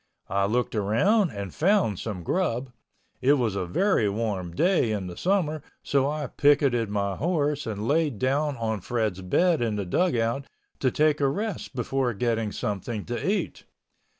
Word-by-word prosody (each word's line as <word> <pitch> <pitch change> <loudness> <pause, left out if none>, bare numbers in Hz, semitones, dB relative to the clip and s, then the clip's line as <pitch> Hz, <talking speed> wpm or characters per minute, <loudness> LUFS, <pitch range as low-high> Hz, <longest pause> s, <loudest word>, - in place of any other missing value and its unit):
I 100 0 +2
looked 120 +4 0
around 140 - +2
and 100 - -6
found 175 - +2
some 100 -6 -5
grub. 130 - -1 0.5
It 135 +3 +5
was 120 -8 0
a 95 -2 -2
very 150 - +2
warm 100 -4 -2
day 175 - +2
in 100 -3 -2
the 90 -1 -7
summer 170 - 0 0.2
so 140 0 +1
I 150 0 -2
picketed 135 -5 +2
my 100 -1 -1
horse 150 -4 0
and 105 0 -3
laid 150 -4 +1
down 140 +4 0
on 110 -3 -2
Fred's 110 -4 -1
bed 165 - +2
in 115 -3 0
the 100 -2 -2
dugout 120 - 0 0.3
to 130 - +2
take 150 +2 +2
a 140 - +4
rest 195 - -3
before 125 -1 -1
getting 115 -1 0
something 105 +2 -3
to 120 0 -4
eat. 205 +3 -2
120 Hz, 165 wpm, -26 LUFS, 105-150 Hz, 0.5 s, It